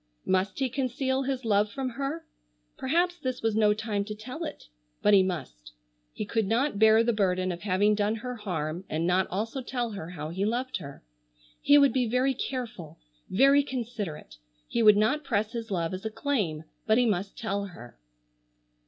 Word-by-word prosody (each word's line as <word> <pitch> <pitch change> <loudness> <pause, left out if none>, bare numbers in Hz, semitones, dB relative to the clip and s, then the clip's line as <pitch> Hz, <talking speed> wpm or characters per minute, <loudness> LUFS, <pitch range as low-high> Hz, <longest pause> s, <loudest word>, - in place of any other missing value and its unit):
Must 190 +1 +1
he 270 - +1
conceal 260 +1 -1
his 265 -2 -3
love 205 -1 +2
from 265 +3 -3
her? 280 +6 -4 0.5
Perhaps 350 +6 0
this 255 -5 -4
was 225 -2 +1
no 215 -1 +4
time 210 -1 -1
to 210 0 -6
tell 255 +10 -7
it. 305 - -6 0.4
But 210 - +5
he 195 - +8
must. - - -4 0.4
He 215 - -5
could 220 0 0
not 235 +1 +1
bear 220 +1 +6
the 235 0 +1
burden 185 -3 +1
of 170 0 -6
having 205 +2 +2
done 210 +1 +1
her 250 +3 -5
harm 175 -4 -3
and 160 +2 -1
not 180 +1 +2
also 225 +8 -3
tell 245 -2 -3
her 185 -5 -6
how 155 -3 -6
he 185 +4 -2
loved 245 +5 -1
her. 140 - -10 0.6
He 290 - +6
would 280 -1 +5
be 255 -3 +1
very 255 +4 +2
careful, 240 - -5 0.3
very 275 +7 +5
considerate, 220 - -5 0.3
he 235 - 0
would 210 -2 +7
not 265 +9 +2
press 215 -5 0
his 230 -1 -5
love 170 -3 -1
as 185 - -5
a 220 - -2
claim, 210 - -1 0.2
but 220 +1 +4
he 250 - +4
must 200 -3 -1
tell 200 -4 -2
her. 120 - -12
220 Hz, 190 wpm, -28 LUFS, 190-255 Hz, 0.6 s, he